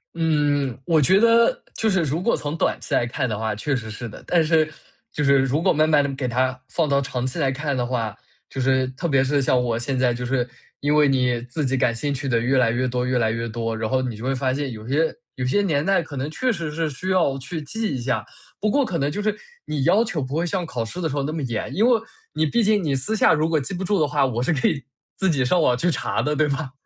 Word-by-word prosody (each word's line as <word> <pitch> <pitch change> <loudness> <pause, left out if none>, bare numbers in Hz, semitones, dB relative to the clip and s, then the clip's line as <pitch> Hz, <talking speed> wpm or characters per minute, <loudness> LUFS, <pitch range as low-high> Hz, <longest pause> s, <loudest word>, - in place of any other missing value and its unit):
嗯。 145 -6 +1
我 160 -2 +3
觉 190 +8 +5
得 230 +1 +4
就 220 - +1
是 190 -3 +2
如 155 +2 -1
果 235 - +2
从 150 +2 -4
短 - - 0
期 - - -6
来 120 - +3
看 125 +2 -2
的 110 -3 -3
话， 110 -1 -2
确 140 +7 -1
实 115 -3 -5
是 115 +3 -6
的。 110 - -11
但 170 -2 +3
是 155 -1 +2 0.4
就 150 - -2
是 140 -1 +5
如 135 +3 +1
果 185 - +3
慢 155 0 +3
慢 150 -2 +4
地 140 -1 -2
给 135 -2 -2
他 130 +1 0
放 165 -3 0
到 140 -1 +2
长 125 -2 -3
期 130 - -3
来 135 - +2
看 140 +1 -2
的 125 -1 0
话， 115 -4 -2 0.3
就 135 - -4
是 130 0 +2
特 130 +6 -4
别 135 -4 +3
是 140 +1 +1
像 130 -1 +2
我 115 -2 -1
现 130 +2 -2
在 125 -1 +3
就 125 +1 -4
是， 125 -1 0 0.3
因 145 +1 +1
为 150 -1 +5
你 125 -3 +1
自 125 +5 -3
己 135 0 0
感 125 -2 +2
兴 145 +4 -2
趣 135 0 -4
的 120 -3 +2
越 130 +3 +1
来 120 -3 +3
越 125 +2 0
多 125 0 -1
越 125 0 +1
来 110 -2 +2
越 115 +1 -3
多， 115 0 -3
然 110 -1 -2
后 130 +1 +1
你 125 -3 -3
就 110 - -9
会 135 +1 0
发 130 0 0
现 140 -1 -2
有 110 -1 -9
些 155 +5 +1 0.2
有 130 - -3
些 165 +11 +2
年 150 -6 0
代 195 -2 +3
可 160 -3 -9
能 135 +3 -2
确 255 +11 0
实 170 -7 -3
是 160 +1 -1
需 150 +7 -5
要 170 -8 +2
去 155 +5 -5
记 215 +6 -3
一 - - -3
下。 120 -3 -1 0.3
不 215 - +1
过 280 +3 +3
可 180 - -2
能 140 0 0
就 205 - -3
是 210 0 0 0.3
你 145 -3 -2
要 195 +9 +4
求 175 -9 -2
不 130 +1 -5
会 165 +2 0
像 180 0 -1
考 125 -7 -3
试 175 +11 -6
的 160 - 0
时 145 - -4
候 140 - 0
那 150 +3 -3
么 160 - -3
严。 115 -4 -3
因 215 - +3
为 240 -2 +4 0.3
你 155 0 +1
毕 230 +10 +1
竟 210 0 +3
你 145 -4 0
私 135 +11 -1
下 200 - +5
如 155 +1 +1
果 160 -2 +2
记 140 +7 -5
不 185 +1 -3
住 195 +1 +1
的 155 - +3
话， 145 -1 +2
我 120 -2 -1
是 170 - +1
可 135 - +1
以 140 -4 -1 0.3
自 190 - +1
己 140 -6 +2
上 175 +8 +2
网 125 -5 +3
去 175 +8 +1
查 135 - -1
的， 150 +5 0
对 155 0 +2
吧？ 140 -1 -3
140 Hz, 310 characters per minute, -23 LUFS, 125-160 Hz, 0.4 s, 觉